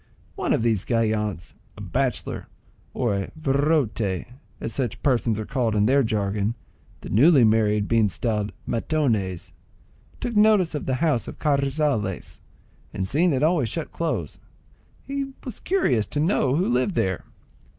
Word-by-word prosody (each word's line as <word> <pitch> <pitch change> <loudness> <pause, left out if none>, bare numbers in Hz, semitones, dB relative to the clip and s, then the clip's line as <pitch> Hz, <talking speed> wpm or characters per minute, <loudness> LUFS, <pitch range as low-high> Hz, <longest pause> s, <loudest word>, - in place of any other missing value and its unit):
One - - -2
of - - +2
these 110 -4 +1
gallants, 105 - -1 0.2
a - - -9
bachelor,—or 125 0 -3
a 95 -1 -3
virote, 135 - +1 0.3
as 115 - -4
such 125 -6 -3
persons 120 -5 +1
are 110 - -3
called 120 -5 -1
in 105 0 +3
their 135 +5 +4
jargon, 105 -1 -1 0.5
the - - -8
newly 140 +4 +6
married 105 -2 +3
being 115 -3 +3
styled 105 +2 -2 0.2
matones,—took 115 - -3
notice 210 -5 +4
of 150 - -4
the 130 - +1
house 145 -8 +1
of - - -8
Carrizales, 140 - -1 0.6
and 95 -1 -2
seeing 170 - +2
it 135 0 0
always 155 -7 +2
shut 165 +6 -4
close, 165 -1 -3 0.7
he 275 0 -4
was 250 -5 -6
curious 130 - +1
to 145 - -3
know 145 -5 +2
who 180 +5 +1
lived 130 +9 +1
there. 95 -2 -1
120 Hz, 140 wpm, -24 LUFS, 105-150 Hz, 0.7 s, newly